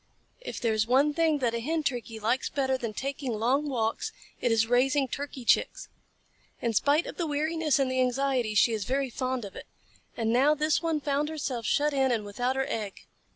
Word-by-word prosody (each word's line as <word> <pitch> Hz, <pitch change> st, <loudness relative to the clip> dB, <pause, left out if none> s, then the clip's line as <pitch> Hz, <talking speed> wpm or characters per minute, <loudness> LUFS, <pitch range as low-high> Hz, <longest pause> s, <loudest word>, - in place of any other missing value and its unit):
If -, -, -6 dB
there 230 Hz, -2 st, +1 dB
is 220 Hz, 0 st, +1 dB
one 275 Hz, +4 st, +3 dB
thing 320 Hz, -1 st, +2 dB
that 235 Hz, -2 st, +1 dB
a 235 Hz, -, -1 dB
Hen 315 Hz, +6 st, -1 dB
Turkey 240 Hz, -5 st, -3 dB
likes 235 Hz, +5 st, 0 dB
better 265 Hz, -2 st, 0 dB
than 235 Hz, -4 st, -3 dB
taking 265 Hz, +2 st, -4 dB
long 260 Hz, +7 st, +1 dB
walks, 225 Hz, -4 st, -1 dB, 0.3 s
it 245 Hz, -, +1 dB
is 225 Hz, -1 st, +3 dB
raising 265 Hz, +4 st, +2 dB
Turkey 275 Hz, -1 st, -6 dB
Chicks. -, -, +1 dB, 0.7 s
In 235 Hz, -1 st, -1 dB
spite 290 Hz, +9 st, +3 dB
of -, -, -8 dB
the 340 Hz, -, -1 dB
weariness 310 Hz, 0 st, +1 dB
and 270 Hz, -2 st, +1 dB
the 260 Hz, 0 st, +1 dB
anxiety, 255 Hz, -3 st, 0 dB
she 230 Hz, -, +5 dB
is 210 Hz, -3 st, -2 dB
very 270 Hz, 0 st, -1 dB
fond 255 Hz, -1 st, -2 dB
of 195 Hz, -, -10 dB
it. -, -, -9 dB, 0.5 s
And 225 Hz, -1 st, 0 dB
now 280 Hz, +5 st, +4 dB
this 305 Hz, +1 st, +1 dB
one 325 Hz, -3 st, -1 dB
found 290 Hz, +1 st, 0 dB
herself 265 Hz, -7 st, -3 dB
shut 295 Hz, +1 st, +2 dB
in 265 Hz, -2 st, +2 dB
and 220 Hz, -3 st, -1 dB
without 245 Hz, +6 st, -1 dB
her 265 Hz, 0 st, 0 dB
egg. 210 Hz, -7 st, -4 dB
260 Hz, 205 wpm, -28 LUFS, 235-290 Hz, 0.7 s, she